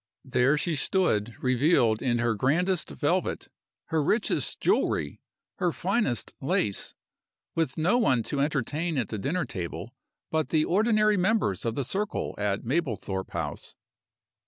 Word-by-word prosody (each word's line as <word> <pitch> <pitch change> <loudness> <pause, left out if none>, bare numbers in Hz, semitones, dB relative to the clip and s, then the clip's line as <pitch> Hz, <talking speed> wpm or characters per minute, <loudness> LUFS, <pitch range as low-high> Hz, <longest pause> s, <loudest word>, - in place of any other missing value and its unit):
There 130 +2 +3
she 165 +2 0
stood 120 - +1
revealed 125 -3 +3
in 120 -3 +1
her 120 -1 +1
grandest 160 - +1
velvet, 70 - -1 0.4
her 160 -1 +2
richest 210 +9 0
jewelry, - - +1 0.4
her 180 -3 +1
finest 185 - -1
lace 100 -2 0 0.6
with 160 -6 -1
no 180 +10 +3
one 130 - +3
to 140 - -3
entertain 150 +3 -1
at 125 - -1
the 110 - -4
dinner 170 - -1
table 85 +5 -6 0.4
but 160 -1 0
the 155 -1 +2
ordinary 215 +1 +3
members 185 - +1
of 115 -1 -1
the 140 - -1
circle 200 - -2
at 100 0 -1
Mablethorpe 115 - -2
House. 75 -3 -5
140 Hz, 135 wpm, -27 LUFS, 115-180 Hz, 0.6 s, There